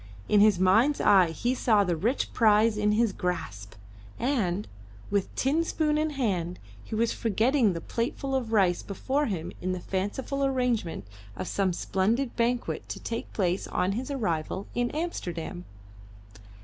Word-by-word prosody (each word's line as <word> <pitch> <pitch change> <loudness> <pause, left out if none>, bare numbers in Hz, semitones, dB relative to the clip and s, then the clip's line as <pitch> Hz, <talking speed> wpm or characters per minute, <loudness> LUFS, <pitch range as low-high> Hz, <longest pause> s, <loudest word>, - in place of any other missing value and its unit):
In 210 - +4
his 210 -2 +5
mind's 220 +11 +4
eye 190 -4 +5
he 240 +10 -1
saw 220 -5 +3
the 180 -3 0
rich 225 - -1
prize 215 0 +4
in 210 0 +2
his 225 -1 +2
grasp; 160 - -4 0.4
and, 210 -8 0 0.4
with 200 -2 +1
tin 295 +5 +1
spoon 310 -2 0
in 310 +1 +1
his 290 - -8
hand, 180 -8 -1 0.3
he 220 - -6
was 230 +1 +1
forgetting 230 0 +2
the 165 - -5
plateful 250 +6 -3
of 250 -4 -1
rice 190 -5 +3
before 270 +9 -1
him 180 -4 -3
in 185 +1 -1
the 185 - -3
fanciful 205 +10 -2
arrangement 250 - 0 0.3
of - - -5
some 195 -2 +1
splendid 220 +9 0
banquet 240 +1 -1
to - - -5
take 230 0 -5
place 185 -2 -1
on 185 - 0
his 245 +7 -3
arrival 190 - -2
in 245 0 0
Amsterdam. 180 - -4
215 Hz, 160 wpm, -27 LUFS, 185-250 Hz, 0.4 s, his